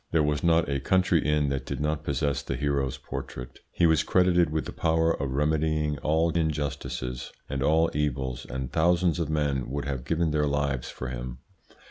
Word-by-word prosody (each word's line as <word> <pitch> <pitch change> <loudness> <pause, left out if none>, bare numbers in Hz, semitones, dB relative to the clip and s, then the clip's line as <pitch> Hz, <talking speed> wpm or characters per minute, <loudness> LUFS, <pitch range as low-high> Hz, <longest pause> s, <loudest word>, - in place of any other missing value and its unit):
There 80 -2 +2
was 75 0 0
not 85 -1 +3
a 70 0 0
country 90 +2 +2
inn 75 -1 +2
that 70 -1 -2
did - - -5
not 75 +1 -1
possess 70 -1 0
the - - -4
hero's 70 -3 -1
portrait. 60 0 -7
He 85 - +2
was 80 -2 +4
credited 90 -2 +3
with 80 +1 -2
the - - -5
power 80 0 +2
of 70 -4 -3
remedying 75 0 +1
all 80 +2 +2
injustices 70 -6 -2 0.2
and 70 -1 -3
all 80 +4 +3
evils, 70 -4 -2
and 65 -1 -4
thousands 85 +2 +2
of 80 -3 -1
men 70 -5 0
would 70 +2 -3
have 70 -3 -3
given 80 +3 0
their 75 -1 +1
lives 70 -3 -1
for 65 - -6
him. - - -5
75 Hz, 185 wpm, -27 LUFS, 70-80 Hz, 0.2 s, was